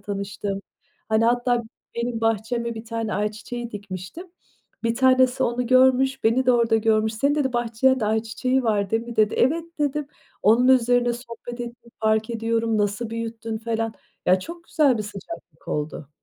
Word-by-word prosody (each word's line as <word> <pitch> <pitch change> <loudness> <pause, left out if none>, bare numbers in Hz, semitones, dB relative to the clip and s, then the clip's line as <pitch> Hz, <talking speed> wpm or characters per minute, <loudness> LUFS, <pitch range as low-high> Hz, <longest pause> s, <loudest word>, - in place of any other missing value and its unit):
tanıştım. 200 0 -4 0.5
Hani, 220 +1 +3
hatta 245 0 +2 0.3
benim 235 -1 -2
bahçeme 225 +1 0
bir 220 - -7
tane 230 -1 -3
ayçiçeği 215 +4 -3
dikmiştim. 200 - -7 0.6
Bir 230 0 +1
tanesi 255 0 +4
onu 245 +1 0
görmüş, 260 +1 +4
beni 245 +3 +3
de 250 - +6
orada 230 -2 +3
görmüş. 220 0 +2
"Senin" 280 +6 +1
dedi, 280 -4 0
"bahçende 240 +1 +2
ayçiçeği 225 +4 0
var 205 -4 0
değil 225 +1 +1
mi?" 235 0 -8
dedi. 215 -1 +3
"Evet." 320 +6 +2
dedim. 295 0 0 0.4
Onun 230 +5 +5
üzerine 245 -1 +4
sohbet 240 0 -8
ettim, 235 0 -8
"Fark 220 +1 +1
ediyorum, 225 -1 0
nasıl 205 +3 -1
büyüttün?" 230 -1 -4
falan. 225 0 -2 0.3
Ya, 185 +1 +5
çok 340 - -9
güzel 285 -9 +3
bir - - -1
sıcaklık 205 - -10
oldu. 150 -1 -3
230 Hz, 155 wpm, -24 LUFS, 220-245 Hz, 0.6 s, de